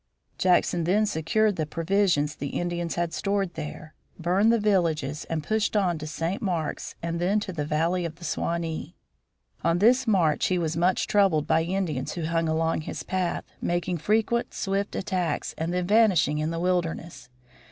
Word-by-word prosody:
Jackson 175 -2 +2
then 205 +5 +3
secured 210 +3 +1
the 155 -2 -1
provisions 165 -3 +1
the 140 - -4
Indians 175 -1 -2
had 170 -1 -1
stored 195 -2 -1
there, 155 0 -7 0.2
burned 185 +6 +3
the 230 - +3
villages 165 -8 0
and 160 -2 -3
pushed 215 +4 0
on 180 -5 +1
to 155 - -6
St. 165 +5 -3
Marks 170 -7 -3
and 170 0 -2
then 195 +4 +2
to 200 -3 -5
the 150 -3 -2
valley 165 +4 +1
of 165 -2 -4
the 170 - -15
Suwanee. 165 0 -3 0.7
On 170 0 +2
this 245 +6 +4
march 170 -8 +3
he 185 - +1
was 165 -2 -1
much 180 +3 +2
troubled 190 -8 +3
by 160 - +3
Indians 165 -6 -2
who 170 - -4
hung 165 0 0
along 160 0 0
his - - -6
path, 185 -2 -1 0.2
making 175 0 -1
frequent 220 +7 0
swift 200 +1 -2
attacks 180 -3 -2
and 165 +2 -2
then 180 0 -1
vanishing 185 -8 +3
in 155 +1 -1
the 165 0 -3
wilderness. 175 -3 -2
175 Hz, 175 wpm, -26 LUFS, 160-195 Hz, 0.7 s, this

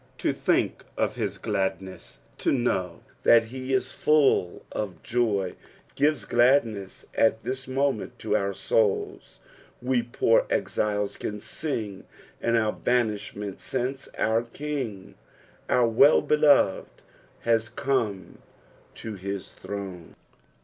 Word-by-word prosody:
To - - 0
think - - 0
of - - +1
his - - -3
gladness, 95 -3 -3 0.2
to - - +1
know 95 -9 0 0.2
that 115 -1 +6
he 130 +3 -6
is 130 -1 0
full 145 -12 +2
of 100 -4 -5
joy, 105 -6 0 0.4
gives 145 -6 +1
gladness 120 -5 +2
at 110 0 +2
this 130 +1 -4
moment 135 -3 -1
to - - -1
out 100 0 0
souls. 105 0 0 0.4
We 125 0 +1
poor 115 -1 +2
exiles 105 -1 -1
can 105 0 -4
sing 110 -7 -4 0.4
in 115 - +1
our 110 -2 +2
banish 115 -4 0
ment 100 -1 -6
since 130 +1 -3
our 110 +1 +2
King, 120 -7 -5 0.6
our 125 -1 +4
Wellbeloved, 140 -1 +4 0.4
has 115 -1 +1
come 115 -8 -2 0.6
to 110 - -6
his 100 0 -5
throne. 95 -4 -7
115 Hz, 115 wpm, -26 LUFS, 100-130 Hz, 0.6 s, that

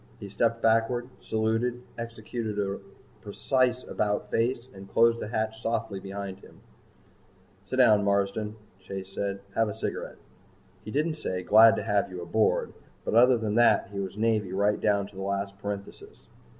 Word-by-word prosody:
He 100 - -8
stepped 115 +3 0
backward, 115 +2 +2
saluted, 115 +3 -1
executed 115 -1 -5
a 100 -1 -1 0.4
precise 125 +4 0
about 105 -1 -2
face 120 +2 0
and 95 0 -11
closed 115 0 +4
the - - -4
hatch 110 0 -2
softly 115 -3 -2
behind 95 0 -6
him. - - -17 1.0
"Sit 100 - -5
down, 110 -5 +5
Marsden," 100 +2 0 0.2
Chase 95 0 -8
said. 100 0 -3
"Have 115 -1 +2
a 105 - -5
cigarette." - - -4 0.7
He - - -8
didn't 155 +6 0
say, 90 -10 -3
"Glad 110 +4 +7
to - - -3
have 100 -1 +1
you 90 -1 -7
aboard." 105 +5 +1 0.3
But - - -2
other 125 +2 +6
than 110 -2 -2
that 115 -5 +4
he 100 - -3
was 95 0 -5
Navy 110 -4 +1
right 100 +2 +1
down 100 -2 +2
to 100 0 -15
the 95 - -6
last 100 0 -2
parenthesis. 100 0 -7
105 Hz, 165 wpm, -27 LUFS, 100-115 Hz, 1.0 s, Glad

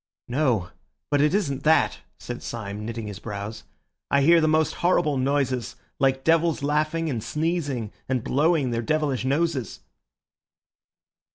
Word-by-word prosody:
"No, 120 - +1 0.4
but 145 -1 +3
it 150 +5 +3
isn't 140 -10 -1
that," 155 -1 +3 0.2
said 120 0 -7
Syme, 105 -2 -5
knitting 115 0 -5
his 105 -1 -7
brows. 105 +1 -6 0.4
"I 140 0 +3
hear 165 +3 +6
the 155 - +3
most 155 0 +2
horrible 165 -4 +2
noises, 130 -2 0 0.2
like 135 -1 +2
devils 165 -1 +2
laughing 155 +3 0
and 120 -8 -2
sneezing 150 -8 -2 0.2
and 130 -3 0
blowing 150 -2 +2
their 115 0 -1
devilish 145 -1 0
noses!" 145 -1 -1
140 Hz, 140 wpm, -25 LUFS, 120-155 Hz, 0.4 s, hear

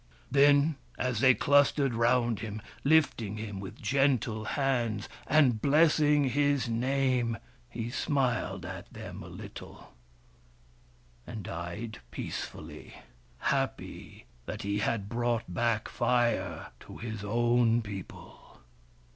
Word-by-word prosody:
Then, 145 +2 +5 0.2
as 125 -3 -1
they 130 +1 +6
clustered 140 -1 +3
round 120 -1 +2
him, 110 -1 -5 0.2
lifting 135 -9 +2
him 105 -3 -5
with 95 -1 -8
gentle 120 -3 +1
hands 120 -5 0 0.2
and 130 -7 +4
blessing 150 -1 +4
his 145 0 +2
name, 125 0 +1 0.3
he 120 0 -5
smiled 120 - -1
at 95 0 -8
them - - -8
a - - -9
little, - - -10 1.3
and 110 -3 -6
died 90 - -6
peacefully, - - -7 0.6
happy - - -4 0.2
that - - -5
he 100 +1 -1
had 105 -2 -1
brought 120 +1 0
back 115 +4 0
Fire 120 0 0
to - - -11
his 110 -3 -6
own 120 +2 +2
people. 100 -3 -10
120 Hz, 110 wpm, -30 LUFS, 110-135 Hz, 1.3 s, they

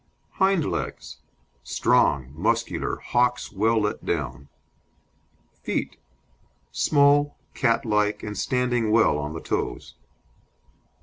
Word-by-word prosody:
HIND 190 -5 +3
LEGS 65 - -4 0.4
Strong, 65 +2 +1
muscular, 115 +7 -1
hocks 125 0 0
well 110 +3 +2
let 105 0 -2
down. 70 0 -3 1.1
FEET - - -3 0.7
Small, 145 - +3 0.2
catlike, 105 -2 +1
and 105 -1 -5
standing 125 0 0
well 110 -9 +3
on 75 +1 -4
the 80 - -6
toes. - - -3
115 Hz, 95 wpm, -24 LUFS, 95-125 Hz, 1.1 s, HIND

